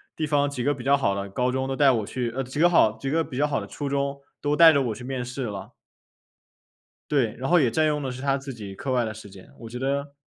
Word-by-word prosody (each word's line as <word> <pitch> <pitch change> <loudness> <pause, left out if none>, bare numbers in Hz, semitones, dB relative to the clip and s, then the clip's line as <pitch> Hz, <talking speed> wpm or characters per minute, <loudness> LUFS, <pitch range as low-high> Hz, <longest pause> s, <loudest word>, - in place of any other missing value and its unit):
地 155 - -1
方 145 -1 +1
几 135 -4 -4
个 145 +3 +2
比 130 - -9
较 140 +2 +4
好 115 -8 +1
的 100 0 -4
高 125 +5 0
中， 130 +1 -1
都 135 - -2
带 140 -1 +5
我 115 -4 0
去 125 -3 -3
呃， 135 - -2
几 130 +2 -7
个 175 - +6
好 110 -11 +4
几 125 +5 -5
个 165 +3 +2
比 150 -4 -6
较 145 - +3
好 145 -2 0
的 - - -7
初 145 -2 -5
中， 140 0 -1 0.2
都 145 0 +1
带 165 +1 +9
着 140 -3 +2
我 115 -4 -2
去 125 - -10
面 130 -1 -3
试 125 +2 -5
了。 100 -4 -6 1.4
对， 130 -7 +1
然 130 +2 -3
后 175 - +6
也 130 - +3
占 155 +6 +2
用 150 -1 0
的 135 - -3
是 125 +1 -7
他 140 0 +1
自 135 0 -7
己 100 -4 -8
课 135 - -6
外 125 -1 +2
的 110 - -4
时 105 -1 -11
间， 95 -1 -15
我 115 - -9
觉 120 - -7
得 140 +2 -2
135 Hz, 310 characters per minute, -25 LUFS, 120-140 Hz, 1.4 s, 带